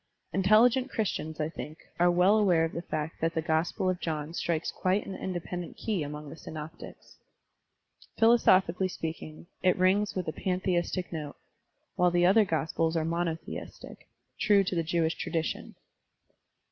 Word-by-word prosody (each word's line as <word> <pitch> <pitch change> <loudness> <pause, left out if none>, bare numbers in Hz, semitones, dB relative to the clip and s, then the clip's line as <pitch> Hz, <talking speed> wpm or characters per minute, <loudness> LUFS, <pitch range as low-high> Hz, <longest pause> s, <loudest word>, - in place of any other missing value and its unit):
Intelligent 225 +7 +4
Christians, 160 -10 -3
I 150 - 0
think, 155 -1 -8 0.2
are 175 +1 +5
well 180 +5 +4
aware 175 -6 +4
of 165 - -4
the 170 - -4
fact 155 -2 -4
that 165 +1 0
the 160 - +1
Gospel 160 +3 0
of 185 -1 0
John 155 -1 -3
strikes 170 -2 -1
quite 185 +2 0
an 195 - -6
indepei:ident 175 -1 -5
key 210 -6 -2
among 150 +1 -6
the - - -8
Synoptics. 155 +1 -10 1.0
Philosophically 190 -6 +4
speaking, 160 -2 -6 0.2
it 185 -1 +3
rings 190 +3 +2
with 185 -2 -3
a 155 - -2
pantheistic 180 -1 -1
note, 150 -3 -5 0.6
while 180 0 +4
the 175 0 +3
other 205 +4 +5
gospels 165 -1 0
are 160 - 0
monotheistic, 165 0 -5 0.3
true 205 -2 +4
to 185 - -3
the 170 - +1
Jewish 165 0 0
tradition. 165 -2 -3
175 Hz, 150 wpm, -29 LUFS, 160-190 Hz, 1.0 s, are